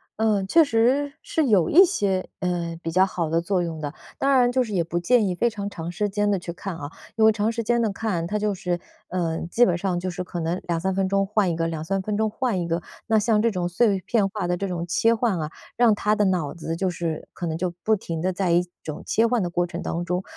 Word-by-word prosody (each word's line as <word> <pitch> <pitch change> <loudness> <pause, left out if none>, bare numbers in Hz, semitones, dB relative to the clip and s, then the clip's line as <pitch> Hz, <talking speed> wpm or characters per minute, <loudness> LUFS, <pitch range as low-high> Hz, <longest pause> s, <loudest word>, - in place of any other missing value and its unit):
呃， 215 -3 +1
确 330 +12 +5
实 270 +3 +2
是 315 -3 0
有 190 -8 +3
一 365 +5 +9
些， 195 - 0
呃， 170 -2 -2
比 165 - -2
较 185 +3 +4
好 175 -4 -1
的 165 +1 +2
作 180 +1 0
用 165 -2 -5
的。 145 -2 -3 0.3
当 275 - +2
然 250 -2 +4
就 255 0 +2
是 225 - -7
也 175 -3 +2
不 170 +1 -2
建 220 +4 +3
议 185 - 0
非 235 +7 +1
常 205 -3 -5
长 170 -2 -5
时 205 +4 -1
间 205 +1 0
地 200 - +2
去 175 -1 -6
看 185 -1 -6
啊， 145 -1 -7 0.2
因 220 -1 +4
为 220 - +7
长 215 +1 0
时 230 0 -3
间 235 +2 +2
地 220 -2 +1
看， 195 -5 -2
它 210 +4 -1
就 210 -1 0
是， 180 -2 -2 0.3
呃， 170 -3 -1
基 240 +7 +4
本 180 - +2
上 175 0 -1
就 185 +1 -3
是 180 +1 -4
可 175 -1 -6
能 170 +2 -2
2-3 175 +2 0
分 190 0 0
钟 195 0 +2
换 205 -1 +1
一 170 - -1
个， 165 0 -1
2-3 165 +4 -2
分 210 +1 -2
钟 220 +1 +1
换 220 -4 -1
一 170 - -3
个， 165 0 0 0.3
那 220 - +3
像 215 0 +3
这 230 - +3
种 180 -5 -2
碎 195 +2 +2
片 210 -5 +2
化 205 -2 -3
的 175 0 0
这 195 +3 -3
种 175 -2 -3
切 225 +7 +3
换 220 -6 0
啊， 155 -1 -3 0.3
让 235 -3 +4
他 210 +1 +1
的 210 -1 +2
脑 180 -6 0
子 165 -1 -4
就 185 +2 0
是 165 -2 -4
可 175 - -4
能 160 -1 -2
就 180 +1 -1
不 220 - +3
停 165 -5 -5
地 185 +2 +1
在 185 -1 0
一 175 +1 +4 0.2
种 155 -1 -6
切 225 - +3
换 235 0 +1
的 175 - -1
过 175 0 0
程 175 0 -6
当 170 +1 -3
中。 180 +2 -1
190 Hz, 285 characters per minute, -24 LUFS, 175-215 Hz, 0.3 s, 一